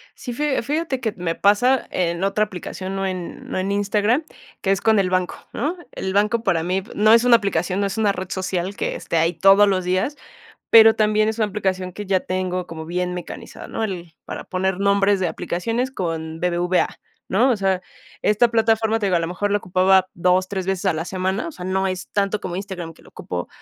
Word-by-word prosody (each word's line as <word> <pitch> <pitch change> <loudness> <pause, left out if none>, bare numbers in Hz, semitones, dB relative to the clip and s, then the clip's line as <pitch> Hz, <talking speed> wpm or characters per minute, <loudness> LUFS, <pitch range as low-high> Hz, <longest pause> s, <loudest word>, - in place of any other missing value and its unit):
Sí, 245 - -6
fija 290 +1 0
fíjate 290 0 -1
que 220 -3 -1
me 165 -2 -2
pasa 245 +6 +3
en 170 0 -1
otra 205 +2 +2
aplicación, 190 -1 -6
no 195 0 -1
en 185 -2 -5
no - - -3
en 190 +2 -1
Instagram, 205 +7 +1 0.4
que 195 - +1
es 195 - +1
con 220 -2 +4
el 185 -2 +1
banco, 185 -1 0 0.2
¿no?, 310 +9 -2
el 190 - -4
banco 210 +3 +2
para 175 -6 +1
mí 185 +3 0
p 215 - -15
no 215 +1 +5
es 230 +1 +6
una 245 -1 +7
aplicación, 190 -2 -1
no 200 - +1
es 195 - -5
una 210 -2 +3
red 185 -1 -5
social 190 0 -2
que - - -2
esté 165 - -3
ahí 165 +2 +2
todos 195 +5 +6
los 185 -2 +1
días, 185 +11 -1 0.5
pero 225 -1 +8
también 215 0 +2
es 220 - -2
una 215 - +2
aplicación 190 -3 -2
que 205 +1 -7
ya 190 -1 +2
tengo 185 -1 -2
como 160 -2 -8
bien 180 +1 -2
mecanizada, 180 - -8
¿no?, - - -4
el 175 -5 -6
para - - -7
poner 190 0 -1
nombres 200 0 +3
de 180 - +1
aplicaciones 230 +10 -2
con 165 -7 -4
BBVA, 180 +1 0 0.3
¿no?, 235 +8 +3
o 240 - +2
sea, 190 -2 0 0.4
esta 215 +3 +4
plataforma, 225 -1 +2
te 205 - -1
digo, 185 - +2
a 170 - +1
lo 165 - -1
mejor 190 +4 -2
la 205 - +2
ocupaba 185 0 +3
2, 180 +1 +2
3 190 -2 -3
veces 195 0 -1
a 185 - +4
la 160 +1 -3
semana, 190 - -2
o - - -8
sea, 180 - -9
no 190 +1 0
es 185 -1 -4
tanto 200 0 0
como 180 -1 -4
Instagram 185 -4 -6
que - - -21
lo - - -17
ocupo 90 -1 -6
190 Hz, 225 wpm, -22 LUFS, 180-215 Hz, 0.5 s, pero